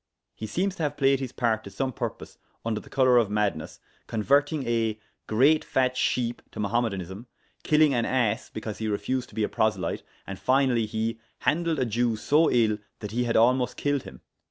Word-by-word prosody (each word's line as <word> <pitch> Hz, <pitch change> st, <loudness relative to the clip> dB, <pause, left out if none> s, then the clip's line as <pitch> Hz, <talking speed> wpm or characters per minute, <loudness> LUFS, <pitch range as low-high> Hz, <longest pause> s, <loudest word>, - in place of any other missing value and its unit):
He 110 Hz, -, -6 dB
seems 185 Hz, -, -1 dB
to -, -, -5 dB
have 150 Hz, -2 st, -1 dB
played 135 Hz, -1 st, +3 dB
his 130 Hz, -3 st, -4 dB
part 115 Hz, -4 st, 0 dB
to -, -, -8 dB
some 135 Hz, -1 st, -3 dB
purpose, -, -, -6 dB, 0.3 s
under 110 Hz, -2 st, -1 dB
the -, -, -16 dB
colour 130 Hz, -2 st, +4 dB
of 110 Hz, -4 st, +1 dB
madness, 105 Hz, -6 st, -2 dB, 0.3 s
converting 140 Hz, +6 st, +1 dB
a 115 Hz, -2 st, 0 dB, 0.3 s
great 140 Hz, +8 st, +4 dB
fatt 130 Hz, -1 st, +1 dB
shepe 120 Hz, -2 st, 0 dB
to -, -, -10 dB
Mohammedanism, 100 Hz, -1 st, -2 dB, 0.3 s
killing 150 Hz, -2 st, +4 dB
an 120 Hz, -2 st, +1 dB
ass 120 Hz, -3 st, 0 dB
because 110 Hz, -1 st, -6 dB
he 110 Hz, -, -2 dB
refused 115 Hz, +5 st, -2 dB
to -, -, -16 dB
be 110 Hz, -, 0 dB
a -, -, +2 dB
proselyte, 110 Hz, 0 st, 0 dB, 0.2 s
and, 100 Hz, -1 st, -7 dB
finally, 130 Hz, -4 st, +2 dB
he 110 Hz, +1 st, -2 dB, 0.2 s
handeled 165 Hz, +1 st, +1 dB
a 130 Hz, -, +1 dB
Jewe 115 Hz, 0 st, 0 dB
so 150 Hz, +9 st, +3 dB
euyll 110 Hz, -3 st, +2 dB, 0.2 s
that 105 Hz, -1 st, -7 dB
he 120 Hz, +2 st, 0 dB
had 115 Hz, -, +1 dB
almost 125 Hz, +2 st, +3 dB
killed 145 Hz, -1 st, 0 dB
hym. -, -, -12 dB
120 Hz, 190 wpm, -26 LUFS, 110-135 Hz, 0.3 s, colour